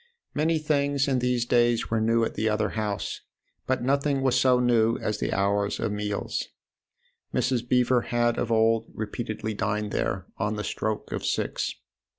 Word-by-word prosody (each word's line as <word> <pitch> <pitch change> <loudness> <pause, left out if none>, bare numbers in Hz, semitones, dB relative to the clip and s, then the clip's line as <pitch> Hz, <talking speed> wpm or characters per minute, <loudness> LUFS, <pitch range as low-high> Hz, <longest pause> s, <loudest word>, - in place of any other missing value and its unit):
Many 160 +2 +2
things 145 -2 +1
in 130 -2 +2
these 125 -1 +1
days 120 -1 +2
were 110 -1 +2
new 115 +1 +3
at - - -1
the 110 +1 0
other 110 0 +1
house, 105 -2 -3 0.5
but 130 -2 0
nothing 140 +1 +1
was 130 -2 +3
so 130 -1 +4
new 115 -2 +3
as 105 -1 -2
the - - -1
hours 100 +1 +1
of 115 -2 -1
meals. 105 0 -2 0.8
Mrs. 125 -2 0
Beever 125 0 +3
had 120 0 0
of 115 - -1
old 115 0 +3
repeatedly 110 0 -4
dined 105 0 -1
there 95 -1 -1
on 105 0 -1
the 105 - -3
stroke 110 +1 -3
of - - -3
six. - - -1
115 Hz, 165 wpm, -26 LUFS, 105-125 Hz, 0.8 s, so